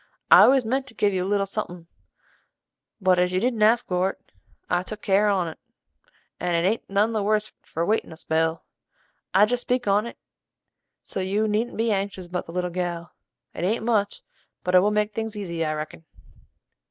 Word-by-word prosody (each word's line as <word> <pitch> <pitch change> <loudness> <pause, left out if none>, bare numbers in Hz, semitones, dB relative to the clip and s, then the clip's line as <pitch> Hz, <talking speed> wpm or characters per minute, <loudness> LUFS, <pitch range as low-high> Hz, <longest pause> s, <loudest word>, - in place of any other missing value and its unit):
I - - +10
always 265 -2 +4
meant 265 +4 -1
to 240 - -14
give 205 -1 +1
you 185 -1 0
a 190 - -3
little 200 -1 +1
suthing, 180 -4 -4 1.1
but 185 -2 +3
as 180 0 +1
you 185 - +2
didn't 235 0 -1
ask 225 +3 +4
for't, 185 +1 0 0.5
I 180 0 +1
took 210 +3 -8
good - - -14
care 205 +2 +3
on 180 -5 0
't, - - -33 0.8
and 175 0 0
it 170 +2 +2
ain't 220 +4 -2
none 205 +3 +2
the 215 - 0
worse 215 +1 0
for 165 +1 -3
waitin' 215 -2 0
a 160 - -9
spell. 160 0 -1 0.7
I 195 +3 +6
jest 245 +3 -1
speak 245 -2 -1
on't, 210 +4 +1 0.9
so - - -5
you 200 +3 0
needn't 215 +3 -1
be 225 0 +1
anxious 195 -2 -2
about 180 +1 -5
the - - -8
little 180 0 -2
gal. 175 -1 -4 0.4
It - - -5
ain't 220 +4 0
much, 210 -4 0 0.4
but 180 - -1
it 180 - +8
will 200 +3 +3
make 210 0 0
things 220 0 -4
easy 170 -5 -3
I 155 -1 -1
reckon." 155 +1 -6
200 Hz, 195 wpm, -24 LUFS, 180-215 Hz, 1.1 s, I